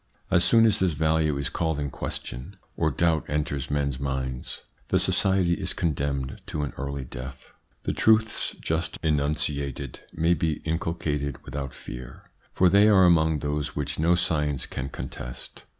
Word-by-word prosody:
As 90 -2 +5
soon 115 -1 +6
as 110 - +3
this 95 -3 +2
value 80 -1 +1
is 70 - -1
called 80 -3 -1
in 70 -2 -2
question, 70 +11 -5 0.2
or 80 - +2
doubt 80 +2 +2
enters 75 -2 -2
men's 70 -3 -1
minds, 65 -2 -3 0.2
the - - +2
society 95 -3 +2
is - - -2
condemned 70 -4 -2
to 75 - -2
an 70 - -4
early 70 0 -4
death. 65 +2 -9 0.3
The - - -1
truths 110 0 +3
just 80 +1 -2
enunciated 70 -3 -1
may 85 +2 +2
be 80 -1 0
inculcated 80 -3 -2
without 70 -2 -4
fear, 60 0 -10 0.2
for 90 - +4
they 100 +4 +6
are 95 -3 +6
among 80 -3 +4
those 75 0 -2
which 75 0 -2
no 85 +2 +4
science 75 -6 +1
can 65 +1 -5
contest. - - -8
75 Hz, 155 wpm, -26 LUFS, 70-85 Hz, 0.3 s, soon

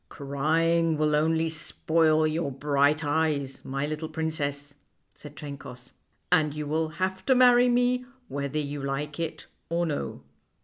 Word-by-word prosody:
" - - -45
Crying 160 +4 +1
will 150 0 +2
only 160 +2 +2
spoil 160 0 +1
your 155 -1 -1
bright 145 +2 +1
eyes, 145 -3 0
my 135 +1 -2
little 155 +1 -4
princess," 145 -3 -3 0.4
said 150 -1 -12
Trencoss, 140 -4 -9 0.2
" - - -45
and 150 -2 +3
you 150 0 -3
will 155 +2 0
have 185 +3 -3
to 260 - +5
marry 245 0 +6
me 245 +1 +2 0.2
whether 140 +1 -3
you 145 -1 -3
like 140 +2 -3
it 165 -1 -4 0.2
or 170 +1 +1
no." 150 -3 -4
155 Hz, 150 wpm, -27 LUFS, 145-165 Hz, 0.4 s, marry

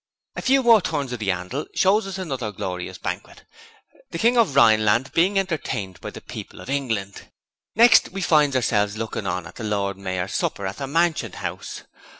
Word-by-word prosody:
A - - -4
few 265 +1 +3
more 230 -3 +6
turns 145 -7 -2
of 125 - -5
the 105 -3 -2
'andle 90 +11 -3
shows 195 +2 +3
us 195 -1 -5
another 135 - -4
glorious 90 -2 -5
banquet - - -6 0.6
the - - -5
King 235 +7 +3
of 225 - +3
Rhineland 115 0 +4
being 185 +4 +2
entertained 155 - -3
by - - -5
the - - -10
people - - -9
of 130 - -7
England. 115 -8 -3 0.5
Next 230 +1 +6
we 195 +1 -6
finds 150 -5 +3
ourselves 105 -4 +1
looking 110 -2 -4
on 90 -2 -2
at - - -12
the - - -6
Lord 100 -2 -1
Mayor's 95 -1 -3
supper 100 - -2
at 95 - -4
the 135 - -4
Mansion 165 +3 0
House. - - -6
130 Hz, 185 wpm, -23 LUFS, -, 0.6 s, more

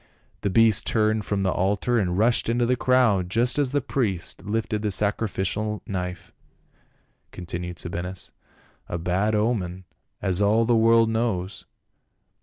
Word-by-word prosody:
"The 100 - 0
beast 110 0 +4
turned 110 -1 +1
from 100 -1 -1
the 95 - +1
altar 105 +7 0
and 90 -3 -1
rushed 115 +2 +2
into 120 +1 +1
the 125 +2 +2
crowd 120 -8 +2
just 120 +7 +1
as 140 -3 +1
the 145 0 +1
priest 105 -12 -2
lifted 105 +1 -2
the 105 - -1
sacrificial 105 +1 -1
knife," 90 -2 -5 1.0
continued 90 0 -6
Sabinus, 90 +2 -5 0.6
"a 85 - -2
bad 95 +5 0
omen, 100 -5 -1 0.4
as 95 0 0
all 110 +3 +3
the 120 0 +3
world 115 0 +4
knows. 105 -4 -2
105 Hz, 140 wpm, -24 LUFS, 95-115 Hz, 1.0 s, beast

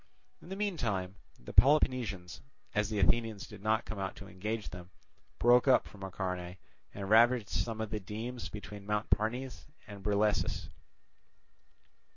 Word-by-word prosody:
In - - -13
the 190 - -4
meantime 115 - -2 0.2
the - - -10
Peloponnesians, 125 -10 +3 0.3
as 105 -1 +1
the 110 - -2
Athenians 105 +2 +2
did 105 -2 -12
not 110 +2 +1
come 110 - -6
out 95 -1 -3
to 100 - -10
engage 105 +4 -4
them, 90 0 -10 0.5
broke 120 +2 +5
up 130 - +5
from 100 - -14
Acharnae 90 -2 -4 0.3
and 100 -1 -6
ravaged 115 0 +5
some 110 +5 -2
of 110 -1 -3
the 105 - -1
demes 110 +2 -5
between 105 -1 -8
Mount 105 0 -1
Parnes 125 +5 -1 0.2
and 100 -2 -10
Brilessus. 105 +1 +1
105 Hz, 150 wpm, -32 LUFS, 95-115 Hz, 0.5 s, broke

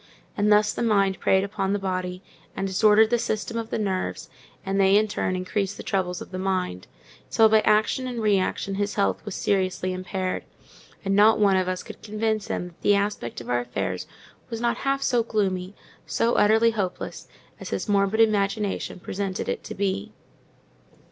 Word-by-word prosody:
And 210 +1 +2
thus 210 0 +4
the - - -4
mind 200 -4 +2
preyed 190 0 +3
upon 200 -1 -2
the - - +1
body, 185 -1 -3 0.3
and 195 - -2
disordered 210 +3 +4
the 240 - +3
system 215 0 -2
of 230 -1 -3
the - - -2
nerves, 185 -6 -3 0.3
and 195 0 0
they 195 +1 +5
in 215 +1 +3
turn 185 -2 -1
increased 190 +2 -2
the - - -7
troubles 180 -2 -1
of - - -17
the 185 - -4
mind, 185 - -2 0.4
till 225 - +5
by 220 0 +5
action 215 +5 +2
and 245 -2 -4
reaction 200 -2 +1
his 205 0 -1
health 200 - 0
was 205 - -5
seriously 185 -1 0
impaired; 185 0 -3 0.6
and 195 0 +1
not 215 +2 +6
one 200 -2 +4
of 185 -1 +1
us 185 0 -2
could - - -11
convince 215 -1 -2
him 180 - -3
that 170 - -24
the 205 - +4
aspect 200 - -2
of 120 - -10
our 120 - +2
affairs 120 -7 -3 0.4
was 230 - -4
not 235 0 0
half 275 0 -1
so 240 -2 +2
gloomy, 195 -4 -1 0.3
so 235 +1 +1
utterly 220 +2 +4
hopeless, 195 -5 -4 0.3
as - - -7
his - - -3
morbid 200 +1 +2
imagination 205 -2 0
represented 190 +1 -4
it - - -3
to - - -7
be. 195 - -2
200 Hz, 185 wpm, -25 LUFS, 185-215 Hz, 0.6 s, not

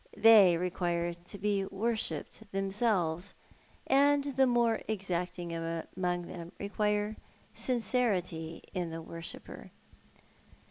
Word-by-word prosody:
They 210 -6 +8
require 175 -1 -1
to 175 +4 -11
be 200 0 +1
worshipped 220 +1 -3
themselves; 195 -3 0 0.5
and 285 +1 +4
the 265 -1 +5
more 235 -2 +2
exacting 180 -4 -3
among 165 +2 -2
them 170 0 -8
require 210 +1 0 0.4
sincerity 195 -10 -1
in 175 -2 -2
the 165 0 -6
worshipper. 165 0 -9
190 Hz, 95 wpm, -31 LUFS, 170-220 Hz, 0.5 s, They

